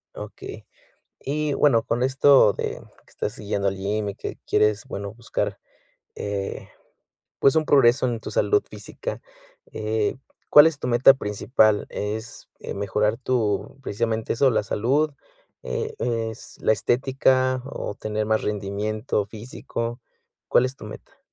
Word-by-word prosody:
Okey. - - -9 0.6
Y 150 +1 -1
bueno, 125 -7 +4
con 120 +2 -1
esto 135 -4 +5
de - - -4 0.3
que - - -23
estás 105 - -4
yendo 100 -2 -1
al 95 - -2
gym 100 +2 -2
y 100 - -9
que - - -6
quieres, 105 -1 +2
bueno, 100 0 -5
buscar, 120 0 -3 0.6
eh, 100 -1 -4 0.7
pues, 135 +2 +4
un 155 - +3
progreso 130 -2 +4
en 115 -2 -2
tu - - -7
salud 415 -1 +2
física, - - -7 0.5
eh, 110 +1 -1 0.3
¿cuál 150 +1 +9
es 160 -3 0
tu 125 - -4
meta 125 +3 +6
principal? 105 -1 +1
¿Es, 110 +3 -5
eh, - - -6
mejorar 105 +2 0
tu, 120 -2 -1
precisamente, 110 -1 -1
eso, 135 +3 +4
la 110 - +1
salud? 135 +10 +1 0.5
Eh, - - -3
¿es 115 -1 -3
la - - +3
estética, 130 +3 +2
o 135 -6 -5
tener 110 0 -3
más 110 0 +1
rendimiento 105 +1 -2
físico? 115 +2 -6 0.5
¿Cuál 125 - +4
es 130 +1 -7
tu - - -11
meta? 105 - -11
115 Hz, 145 wpm, -24 LUFS, 105-130 Hz, 0.7 s, cuál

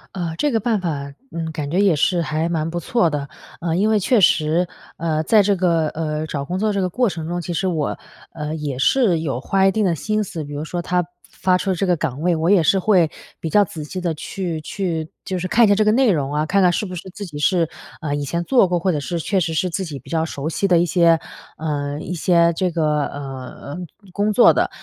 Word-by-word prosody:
呃， 170 -3 -3
这 295 - +1
个 225 - +2
办 220 -1 0
法， 145 -5 -3 0.2
嗯， 165 -1 -4
感 150 -2 -4
觉 185 +4 +2
也 195 -5 +4
是 175 +4 +2
还 155 +1 -1
蛮 165 -2 -1
不 175 +1 -3
错 225 0 +1
的。 145 -2 -3 0.3
呃， 165 -1 -1
因 205 +5 +2
为 215 -1 +3
确 225 +3 +3
实， 165 0 +3 0.3
呃， 160 -1 -1
在 215 +5 +5
这 200 0 +2
个， 170 -3 +2
呃， 155 -1 -3
找 140 -2 -4
工 180 +5 -3
作 215 +1 +1
这 200 - -1
个 185 - +1
过 240 +6 +1
程 160 -4 -5
中， 175 +1 -2
其 175 - -5
实 185 +3 -1
我， 160 -5 -1 0.4
呃， 150 -1 -4
也 145 -4 -4
是 185 - +3
有 135 -6 -2
花 195 +5 +2
一 195 - +5
定 220 +2 0
的 175 -4 +2
心 215 +6 -1
思， 165 -5 -6
比 145 - -8
如 145 +1 -4
说 175 +2 -4
它 180 0 +1 0.3
发 185 -1 +2
出 190 0 -1
这 185 +2 -1
个 180 - +4
的 - - 0
岗 145 -3 -3
位， 175 +1 +2
我 160 +1 -1
也 195 -4 +6
是 195 - +3
会 185 -4 +3 0.3
比 160 - -4
较 205 +3 +4
仔 160 -3 -7
细 185 +5 -6
地 175 -2 -1
去 165 0 -4
去 170 -4 -3 0.2
就 185 -1 -2
是 185 - -3
看 230 +6 +5
一 - - +3
下 205 - +5
这 215 - +3
个 215 - +4
内 245 -1 +4
容 145 -4 -1
啊， 150 +1 0
看 195 +4 +2
看 180 - +5
是 190 - -1
不 185 - -7
是 180 +2 -7
自 200 +2 -7
己 150 -5 -8
是， 170 +1 +2 0.3
呃， 145 -2 -2
以 145 - -2
前 170 +5 -2
做 240 -3 +4
过， 175 -1 0
或 185 +2 +1
者 150 - -1
是 170 +4 -3
确 190 +4 0
实 165 -2 -1
是 180 +4 +1
自 180 +2 -3
己 155 -6 -6
比 135 - -13
较 160 -1 +1
熟 145 -2 -4
悉 180 +5 0
的 180 - +4
一 170 - +3
些 170 -1 +4 0.4
呃， 145 -2 -3
一 180 - -5
些 170 0 +3
这 185 +1 0
个， 155 -3 0
呃， 135 0 -8
嗯， 175 - -6 0.3
工 205 +1 +1
作 235 - +6
的。 - - +1
170 Hz, 280 characters per minute, -21 LUFS, 155-190 Hz, 0.4 s, 也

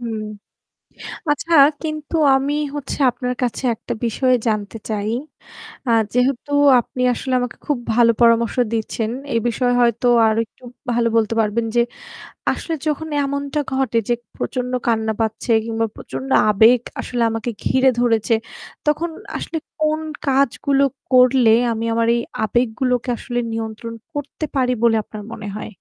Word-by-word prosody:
হুম। 230 -2 -4 1.1
আচ্ছা, 325 +3 -1 0.3
কিন্তু 310 +1 -4 0.2
আমি 275 +2 0 0.2
হচ্ছে 285 -2 -4
আপনার 250 +1 -3
কাছে 245 +2 -2
একটা - - -5
বিষয় 255 +3 +2
জানতে 215 0 -1
চাই। 210 0 -2 0.8
আ - - +2 0.2
যেহেতু 255 +3 0 0.3
আপনি 250 +2 -5
আসলে 260 +2 -4
আমাকে 245 -1 -4
খুব 290 - 0 0.2
ভালো 230 0 +5
পরামর্শ 230 -1 +4 0.2
দিচ্ছেন, 220 0 -2 0.2
এই 230 - +3
বিষয়ে 245 +1 +1
হয়ত 235 -1 +2 0.3
আরেকটু 225 +3 -2 0.3
ভালো 235 0 +2
বলতে 225 0 +2
পারবেন 220 +2 0
যে, 240 - +5 0.7
আসলে 330 - -4
যখন 310 +1 -1 0.2
এমনটা 280 +1 -2
ঘটে 265 -4 0
যে - - +4 0.2
প্রচণ্ড 250 -1 -3 0.2
কান্না 220 -1 +1
পাচ্ছে 220 +2 -2
কিংবা 225 0 -1
প্রচণ্ড 270 - -7 0.2
আবেগ 225 +4 +5 0.2
আসলে 245 -1 -3
আমাকে 225 +1 -3
ঘিরে 260 +1 +3
ধরেছে, 230 -1 +2 0.5
তখন 310 +3 +1 0.3
আসলে 330 - -4 0.2
কোন 310 0 +2 0.3
কাজগুলো 275 0 +2 0.3
করলে 255 -2 +5 0.2
আমি 225 0 -2
আমার 230 0 +1
এই 235 - 0 0.2
আবেগগুলোকে 245 +2 0
আসলে 245 +1 -3
নিয়ন্ত্রণ 225 +1 -5 0.2
করতে 290 +2 -4
পারি 255 -2 +2
বলে 230 -1 +5
আপনার 210 0 -9
মনে 210 - -7
হয়? 215 - -7
240 Hz, 140 wpm, -20 LUFS, 225-270 Hz, 1.1 s, ভালো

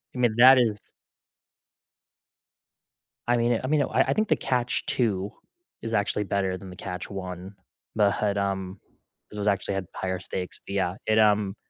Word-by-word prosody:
I - - -6
mean, 120 -3 +2
that 130 +2 +9
is 110 -4 0 2.4
I 120 0 +3
mean 120 0 +1
I - - -2
mean, 150 0 +2
I - - +1
I - - +2
think 215 -1 0
the 155 - +3
Catch 125 -1 -1
Two 105 -5 -1 0.5
is 115 0 -5
actually 105 0 0
better 95 -2 -1
than 95 - -11
the 90 - -10
Catch 90 0 -6
One 95 0 -7 0.4
but, 100 -1 +1
um, 95 -1 -2 0.5
it 105 - -7
was 105 - -2
actually 100 -1 0
had 95 -1 -3
higher 95 -1 -3
stakes, 90 0 -4
but 100 - -6
yeah, 95 -2 0
it, 110 0 +3
um 105 -2 +3
100 Hz, 170 wpm, -26 LUFS, 95-115 Hz, 2.4 s, that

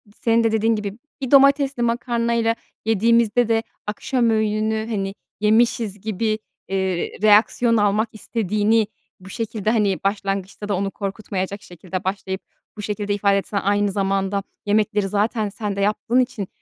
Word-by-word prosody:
senin 230 0 +2
de 225 - +2
dediğin 225 +1 +2
gibi, 205 -1 -4 0.2
bir 260 - -3
domatesli 275 -2 +5
makarnayla 235 -1 +1 0.3
yediğimizde 230 +1 +3
de 225 0 +2 0.2
akşam 240 +3 0
öğününü, 220 0 0
hani, 195 -3 -2 0.3
yemişiz 215 -1 +2
gibi, 215 +1 -1 0.3
eee, 190 -2 -1
reaksiyon 220 +2 +4
almak 210 +2 +2
istediğini 215 0 +1 0.3
bu 190 0 -13
şekilde, 220 0 -2
hani, 205 -5 +1
başlangıçta 195 0 -2
da 200 - +1
onu 195 +1 -1
korkutmayacak 195 -1 -4
şekilde 180 +1 -6
başlayıp 190 0 -3 0.4
bu - - -5
şekilde 205 0 -2
ifade 200 -1 +2
etsen; 200 +1 -2
aynı 205 0 +2
zamanda 195 0 0 0.2
yemekleri 210 -1 +1
zaten 210 +2 0
sen 205 0 -4
de 200 - -2
yaptığın 220 +4 +1
için, 250 -6 -1
210 Hz, 140 wpm, -22 LUFS, 200-230 Hz, 0.4 s, domatesli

